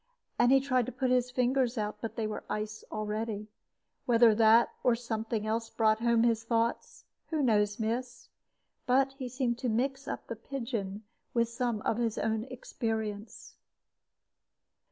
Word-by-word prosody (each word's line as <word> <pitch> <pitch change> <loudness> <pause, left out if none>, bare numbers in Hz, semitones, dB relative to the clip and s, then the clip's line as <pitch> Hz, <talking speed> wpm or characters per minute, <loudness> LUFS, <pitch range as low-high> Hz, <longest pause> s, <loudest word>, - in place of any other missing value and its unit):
And 245 - +5
he 270 - +7
tried 255 -3 +1
to - - -3
put 255 +1 -1
his 250 -1 +2
fingers 250 0 +1
out, 210 -1 -2
but 225 - -5
they 225 - -1
were 215 - -4
ice 215 0 -4
already. 215 0 -3 0.6
Whether 230 -2 +6
that 225 +2 +5
or 245 -2 +4
something 225 -2 -3
else 225 +1 -1
brought 220 -1 +2
home 235 0 +3
his 230 -1 +2
thoughts, 230 0 -1 0.2
who 310 -3 0
knows, 210 -3 +2
miss? 240 +2 -3 0.6
but 270 +2 +3
he 255 -2 -4
seemed 245 -1 -1
to 250 - -1
mix 265 +5 -1
the - - -3 0.2
pigeon 225 -5 -4
up 220 - -45
with 235 -1 +2
some 235 -2 -2
of 225 - 0
his 230 -2 -1
own 220 0 -1
experience. 220 -4 -5
230 Hz, 155 wpm, -30 LUFS, 220-250 Hz, 0.6 s, he